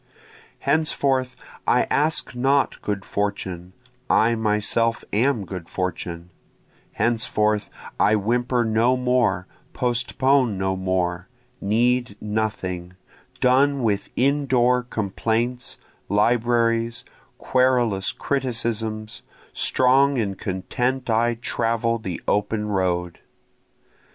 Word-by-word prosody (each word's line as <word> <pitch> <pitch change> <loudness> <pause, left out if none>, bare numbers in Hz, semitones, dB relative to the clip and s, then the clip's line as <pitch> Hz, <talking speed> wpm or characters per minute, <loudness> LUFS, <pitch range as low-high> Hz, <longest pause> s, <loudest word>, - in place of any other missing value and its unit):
Henceforth 135 -3 +1 0.3
I - - +4
ask 155 -1 +1
not 135 +3 +1
good 100 -1 -3
fortune, 95 -3 -3 0.4
I 115 +2 +4
myself 110 +1 0
am 115 -1 +1
good 90 -2 -7
fortune, 90 -1 -4 0.6
Henceforth 110 -2 +1 0.3
I 105 +2 +4
whimper 120 +3 +1
no 115 +3 +2
more, 125 -7 +1 0.3
postpone 125 -1 +1
no 95 0 0
more, 90 -1 -1 0.3
need 120 +1 +1
nothing, 100 -5 -3 0.5
Done 135 +1 +3
with 105 -3 0
indoor 125 -2 +2
complaints, 115 +2 -2 0.3
libraries, 115 +2 +1 0.3
querulous 125 -6 +2
criticisms, 115 -5 -2 0.3
Strong 135 +2 +3
and 100 -4 -1
content 125 +8 -2
I 115 +1 +2
travel 115 0 -1
the 95 -5 -5
open 105 +1 0
road. 90 -3 -1
115 Hz, 90 wpm, -23 LUFS, 100-125 Hz, 0.6 s, I